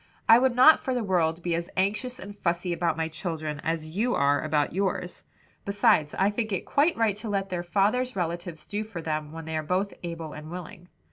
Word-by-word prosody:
"I 225 +1 +8
would 255 -1 +2
not 260 +6 +8
for 260 - -2
the 245 - 0
world 170 -4 +1
be 175 - 0
as 170 +1 -2
anxious 210 +7 0
and 200 +2 -9
fussy 175 -2 -1
about 170 -2 0
my 160 0 0
children 155 -2 -4
as 160 0 -3
you 240 +5 +1
are 140 +1 +3
about 150 -1 0
yours. 185 -1 -2 0.4
Besides, 200 -7 +2
I 195 +2 +3
think 220 0 -2
it 190 - -2
quite 305 +4 +2
right 225 -3 +2
to 215 +1 -5
let 195 -1 -1
their 180 -2 -2
father's 205 +8 +1
relatives 170 -2 -4
do 210 +1 -3
for 195 -6 -7
them 155 -1 -3
when 165 0 -8
they 160 0 -4
are 155 - 0
both 185 +5 -1
able 165 -3 -6
and 155 +1 -9
willing." 180 +1 -8
180 Hz, 215 wpm, -27 LUFS, 160-205 Hz, 0.4 s, I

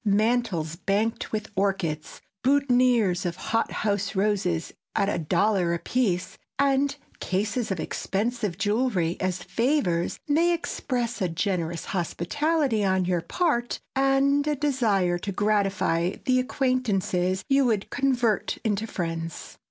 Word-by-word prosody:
Mantels 205 -6 +1
banked 205 +5 -1
with 215 0 -3
orchids, 190 -6 -1 0.2
boutonnières 250 -8 +3
of 175 -2 -2
hothouse 205 0 -1
roses 190 -4 0 0.2
at 200 - +2
a 190 - -1
dollar 180 +1 +2
apiece, 190 -1 -1 0.2
and 280 0 +2 0.2
cases 210 +5 -1
of 190 -4 -2
expensive 210 +2 -2
jewelry 205 -5 +1
as 185 -1 -2
favors, 185 - 0
may 335 +4 +3
express 245 -7 -3
a 185 - +1
generous 170 -1 -2
hospitality 235 - 0
on 190 -1 +2
your 175 -1 0
part 240 - 0 0.2
and 275 +2 +3
a 300 - +2
desire 220 -11 +1
to 200 +2 -4
gratify 195 -4 +1
the 255 0 +3
acquaintances 210 -9 0
you 275 -1 +4
would 215 -5 +1
convert 250 -6 +1
into 215 0 0
friends. 165 -4 -5
205 Hz, 120 wpm, -26 LUFS, 180-255 Hz, 0.2 s, you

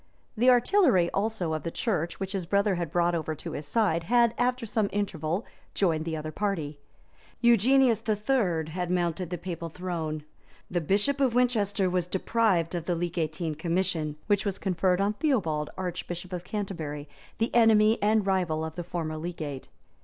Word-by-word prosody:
The 245 +3 +4
artillery, 245 - +4
also, 200 -5 -1
of 155 - -2
the 165 - -3
church, 170 -3 -2
which 195 -1 -3
his 190 -4 -3
brother 200 +2 +2
had 170 -3 -2
brought 175 0 +2
over 160 -2 -2
to - - -7
his 145 0 -6
side, 170 -5 +1
had, 235 +2 +4
after 250 0 0
some 215 -2 0
interval, 185 -2 -2 0.3
joined 160 -5 +1
the 160 -1 -2
other 155 0 -5
party. 155 -6 -2 0.6
Eugenius 235 0 +4
III. 205 - +1
had 180 +1 -3
mounted 175 -1 -1
the 180 - -3
papal 170 -1 -5
throne; 160 -3 -4 0.5
the 175 -1 0
bishop 205 - +1
of 255 -4 +2
Winchester 215 -6 +2
was 180 -1 0
deprived 190 -3 +1
of 175 -2 -3
the 175 - 0
legantine 165 -1 -2
commission, 165 -1 -1
which 205 -1 +2
was 200 -2 -2
conferred 185 -1 +1
on 200 +1 +1
Theobald, 180 - 0
archbishop 180 0 -5
of 175 -1 -4
Canterbury, 165 -8 -4 0.3
the 225 - -1
enemy 220 -1 +5
and 210 0 +3
rival 175 -5 0
of 160 - -6
the 175 - -5
former 165 -2 -4
legate. 155 -5 -5
180 Hz, 170 wpm, -28 LUFS, 165-210 Hz, 0.6 s, enemy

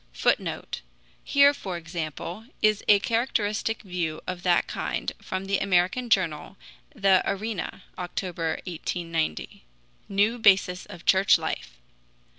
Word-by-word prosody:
[Footnote: - - -1 0.4
Here, 280 0 +5
for 190 -10 -5
example, 170 +4 -5 0.2
is 215 -1 +3
a 205 - +8
characteristic 225 0 -1
view 175 -5 -3
of 180 -1 -4
that 175 -1 +3
kind - - -3
from 185 +1 -4
the 195 0 +1
American 195 +6 +1
journal 185 -2 0 0.4
the 195 -4 +4
ARENA 200 -2 -3 0.2
(October, 175 -2 -3
1890): 165 - -3 0.5
"New 205 +4 +2
Basis 190 -4 +3
of 170 - -11
Church 190 +1 +5
Life." - - -5
190 Hz, 115 wpm, -26 LUFS, 175-210 Hz, 0.5 s, a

